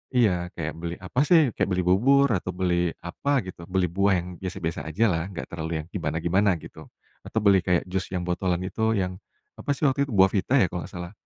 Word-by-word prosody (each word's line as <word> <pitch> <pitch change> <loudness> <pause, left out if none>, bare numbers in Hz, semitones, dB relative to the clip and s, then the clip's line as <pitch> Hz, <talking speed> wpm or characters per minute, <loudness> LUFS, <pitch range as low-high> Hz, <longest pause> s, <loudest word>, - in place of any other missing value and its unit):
iya. 90 -7 +3
Kayak 80 -2 -3
beli 85 0 -4
apa 105 +8 -2
sih, 160 -8 +5
kayak - - -1
beli 90 -1 0
bubur, 135 +10 +4
atau 90 -1 -2
beli 90 -2 0
apa 135 +8 -1
gitu, 85 -2 -10
beli 90 -2 0
buah, 100 +2 +2
yang - - -9
biasa-biasa 90 -4 -4
aja 90 +9 0
lah, 80 +2 -1
nggak - - -6
terlalu 80 -1 -3
yang - - -17
gimana-gimana 90 +3 +1
gitu. 80 -1 -11 0.4
Atau 110 - -2
beli 100 -2 +6
kayak 90 0 +1
jus 95 0 -1
yang 90 -2 -3
botolan 90 0 -1
itu, 110 +4 0
yang, 90 -1 -2 0.4
apa - - -8
sih 150 - -8
waktu 140 0 +2
itu, 115 - -4
Buahvita 95 +6 +3
ya - - +4
kalau 90 -1 -4
nggak - - -19
salah, 90 +1 -6
90 Hz, 215 wpm, -25 LUFS, 85-100 Hz, 0.4 s, beli